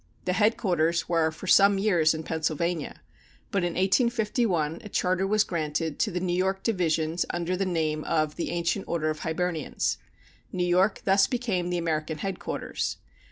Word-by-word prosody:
The 180 - +1
headquarters 180 -5 +1
were 165 -2 +2
for 160 +4 -10
some 200 +2 +6
years 175 -6 +3
in 160 - -5
Pennsylvania, 160 0 -2 0.5
but 200 - +1
in 175 -1 -1
1851 205 - +1
a 210 - -8
charter 185 0 0
was 215 +1 +3
granted 160 -3 -2
to 230 - +2
the 180 -2 -2
New 180 -1 -1
York 190 +2 0
Divisions 165 -5 0
under 175 +1 -1
the 190 +1 -1
name 155 -3 -1
of 155 -2 0
"The - - -3
Ancient 170 +3 -1
Order 155 -2 0
of 155 - -6
Hibernians." 160 -1 -2 0.5
New 180 -1 -1
York 185 +3 +2
thus 195 0 +4
became 215 -8 -1
the 175 - -1
American 160 -2 -2
headquarters. 190 +3 -3
175 Hz, 160 wpm, -27 LUFS, 160-195 Hz, 0.5 s, some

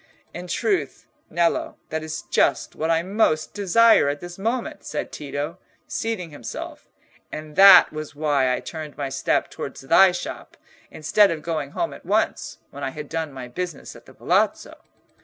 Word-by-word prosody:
"In 175 +1 -7
truth, 180 - -1 0.2
Nello, 170 +1 0
that 160 0 -3
is 155 0 -5
just - - +1
what 160 - -2
I 165 0 +2
most 185 -5 +1
desire 205 -3 +4
at 145 0 -3
this 175 +1 -9
moment," 230 +4 -3
said 150 - -4
Tito, 145 +4 -5 0.3
seating 220 -8 -3
himself; 145 -6 -8 0.4
"and 155 0 -8
that 195 -4 +9
was 155 -1 -7
why 145 -4 +1
I 125 - -1
turned 155 -2 -8
my 140 -2 -3
steps 135 0 -1
towards - - -6
thy 175 +8 +6
shop, 175 - -7 0.3
instead 195 +6 +3
of 160 -2 -4
going 155 -4 -3
home 340 - -1
at - - -12
once, - - -1
when 140 - -8
I - - -1
had 150 +2 -8
done 160 -2 -3
my 130 -2 -8
business 175 +4 -6
at - - -16
the - - -15
Palazzo." - - 0
160 Hz, 170 wpm, -23 LUFS, 145-180 Hz, 0.4 s, that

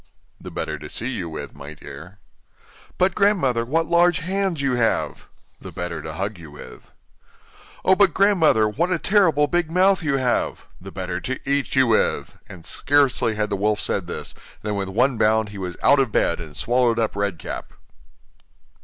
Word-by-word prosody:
'The - - -9
better 75 - -4
to 75 0 -9
see 120 - -3
you 90 -9 -4
with, 80 - -7
my 70 +2 -10
dear.' 90 +5 -11 0.8
'But, 185 0 +2
grandmother, 175 - +2
what 160 +7 0
large 170 +1 +3
hands 185 -1 -2
you 140 -2 0
have!' 120 -2 0 0.3
'The - - -10
better 90 -1 -5
to 80 - -7
hug 95 +3 -4
you 80 -2 -11
with.' 75 - -13 1.0
'Oh! 190 - +6
but, 195 -1 +4
grandmother, 165 - +4
what 160 +12 -1
a 180 - +2
terrible 165 -6 +3
big 175 +2 0
mouth 185 +3 +3
you 145 -4 0
have!' 125 -2 0 0.2
'The - - -9
better - - -4
to 130 0 -4
eat 140 0 0
you 130 0 +5
with!' 115 -2 0
And 85 - -12
scarcely 135 -6 +1
had 105 0 -2
the - - +1
wolf 105 +2 0
said 95 -3 -1
this, - - -6 0.3
than 105 -1 -2
with 100 -1 -3
one 125 +5 +1
bound 110 0 +2
he 100 -1 -9
was 90 -2 -5
out 140 - +5
of 130 -5 +1
bed 85 - +1
and 75 -3 -9
swallowed 120 -1 +2
up 110 -3 -1
Red 100 -3 -1
Cap. - - -7
120 Hz, 185 wpm, -22 LUFS, 100-165 Hz, 1.0 s, Oh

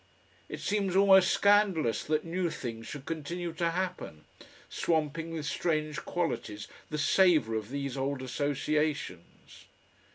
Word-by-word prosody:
It - - -6
seems 200 -3 -1
almost 190 -1 +6
scandalous 200 - +3
that 155 +1 0
new 175 +1 -1
things 115 -6 -6
should 140 -2 -8
continue 170 +2 -4
to 170 +1 0
happen, 180 - -4 0.4
swamping 160 0 -1
with 160 -2 -4
strange 155 -1 -1
qualities 110 -12 -3 0.2
the 155 - -3
savour 155 - +4
of 110 -1 -3
these 140 -1 -4
old 135 0 -2
associations. 145 - -3
155 Hz, 125 wpm, -30 LUFS, 140-175 Hz, 0.4 s, almost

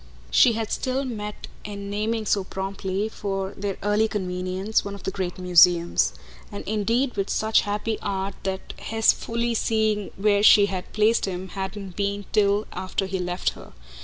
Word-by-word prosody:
She 235 - +6
had 225 -1 -3
still 265 +1 -1
met 210 -4 -6 0.2
it - - -7
in 200 0 -6
naming 215 +2 -1
so 200 -1 +1
promptly, 195 +1 -3
for 195 -3 -3
their 200 -1 -3
early 205 +2 +2
convenience, 185 +1 -1
one 200 0 -5
of 200 - -12
the 190 - -2
great 185 -2 -4
museums; 175 - +4 0.4
and 100 - -7
indeed 230 +5 0
with 195 0 -1
such 220 0 +3
happy 210 +1 -2
art 195 -1 -2
that 190 0 -4
his 225 0 +3
fully 235 +1 -2
seeing 220 -2 +1
where 205 0 +3
she 205 -1 +8
had 190 -2 -5
placed 215 +2 +3
him 185 -1 -5
hadn't 190 0 -6
been 200 0 -2
till 205 0 +3
after 190 +1 -2
he 190 0 -3
left 180 0 -1
her. - - -13
200 Hz, 170 wpm, -24 LUFS, 190-215 Hz, 0.4 s, she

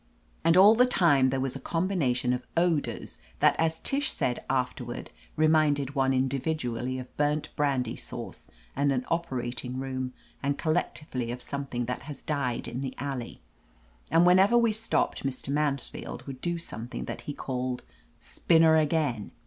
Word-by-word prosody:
And 165 +2 +5
all 200 +3 +9
the 250 +3 +5
time 145 - +4
there 135 +1 0
was 130 -1 -2
a - - -5
combination 165 -9 0
of 125 0 -3
odors 170 -3 0 0.2
that - - +5
as 160 0 +1
Tish 280 +1 0
said 125 - -1
afterward 130 -1 -2 0.2
reminded 150 -3 +3
one 135 -2 +2
in 130 0 +2
dividually 130 -3 -2
of 125 - -10
burnt 150 +1 +1
brandy 140 -4 0
sauce - - -8 0.3
and 140 0 +2
an 130 -2 0
operat 130 -8 -2
ing 125 0 -5
room, 130 -1 -3 0.3
and 140 0 0
collectively 150 -6 -1
of 125 - -5
something 135 -4 -3
that 125 +1 -3
has 145 - -8
died 140 -6 -1
in 125 - -4
the 130 -1 -4
alley. 135 -4 -5 0.7
And 165 +1 +5
whenever 190 +6 +6
we 235 -2 +4
stopped 220 +1 0
Mr. 135 0 -4
Mansfield 145 -2 -2
would 135 -2 -8
do 175 0 -1
something 120 -7 -6
that - - -6
he - - -2
called 125 -1 -3 0.3
"spinner 160 -1 +4
again." 150 -8 +1
140 Hz, 160 wpm, -28 LUFS, 130-160 Hz, 0.7 s, all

